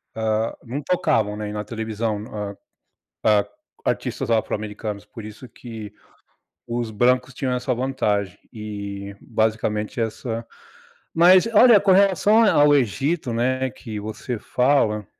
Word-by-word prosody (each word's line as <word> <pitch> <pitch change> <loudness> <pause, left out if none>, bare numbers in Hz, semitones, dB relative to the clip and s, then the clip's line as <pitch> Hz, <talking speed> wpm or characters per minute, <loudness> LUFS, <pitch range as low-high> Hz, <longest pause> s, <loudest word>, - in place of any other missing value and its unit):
hã, 110 0 0
não 130 +5 -5
tocavam, 125 - +1
né 105 -1 -4
na 105 0 -4
televisão, 110 -1 -3
hã 105 -1 -5 0.7
hã, 105 -2 +4 0.4
artistas - - -2
afro-americanos, 105 -2 -2
por 110 +2 -11
isso 110 +4 -10
que 110 -3 -9 0.7
os 120 -1 -3
brancos 125 +4 +2
tinham 125 0 -2
essa 125 +1 -1
vantagem 110 -7 -1 0.2
e 100 -2 -6
basicamente 110 -1 -1
essa 115 +1 -3 0.7
Mas 180 +4 +6
olha 235 0 +8
com 200 -1 +4
relação 200 +3 +4
a 215 - +5
ao 145 0 +5
Egito, 135 - 0
né 130 +3 0
que 110 -1 -7
você 110 +3 -5
fala 115 -5 +1
115 Hz, 125 wpm, -22 LUFS, 105-130 Hz, 0.7 s, olha